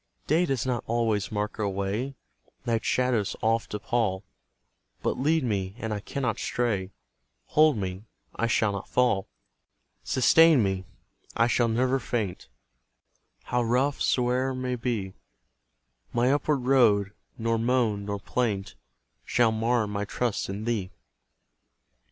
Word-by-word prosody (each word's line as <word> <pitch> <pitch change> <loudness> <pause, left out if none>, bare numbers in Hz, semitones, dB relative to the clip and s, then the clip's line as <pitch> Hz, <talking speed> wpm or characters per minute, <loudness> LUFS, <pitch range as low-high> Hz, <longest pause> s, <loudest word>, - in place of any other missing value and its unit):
Day 170 +4 +2
does 135 -3 -1
not 125 -2 -1
always 115 -3 0
mark 105 +1 -3
our 105 -2 0
way, 100 +8 -2 0.5
Night's 115 -2 0
shadows 125 -5 +1
oft 115 +1 0
appal, 105 -4 -1 0.8
But - - -1
lead 155 +3 +2
me, 100 -5 -2
and 110 -3 -3
I 105 - -2
cannot 125 +1 -3
stray, 105 -6 -1 0.6
Hold 155 -4 +4
me, 95 +1 -4 0.3
I 115 - 0
shall 110 -2 +2
not 100 -1 -5
fall; 120 -6 +1 0.8
Sustain 150 +1 +5
me, 95 -1 -1 0.5
I 115 - +5
shall 120 0 +2
never 130 +4 +1
faint, 110 - -3 0.9
How 125 0 0
rough 125 +4 +1
soe'er 130 +1 +1
may 130 0 -2
be 115 -6 -3 1.0
My 120 +2 +3
upward 145 -1 +1
road, 115 -6 +4 0.3
nor 115 0 0
moan, 115 -4 +1
nor 100 0 -3
plaint 105 -3 -2 0.5
Shall 120 -2 +2
mar 115 +1 +1
my 105 0 -3
trust 115 0 -2
in 100 +3 -4
thee. 110 -6 -1
115 Hz, 130 wpm, -27 LUFS, 105-125 Hz, 1.0 s, Sustain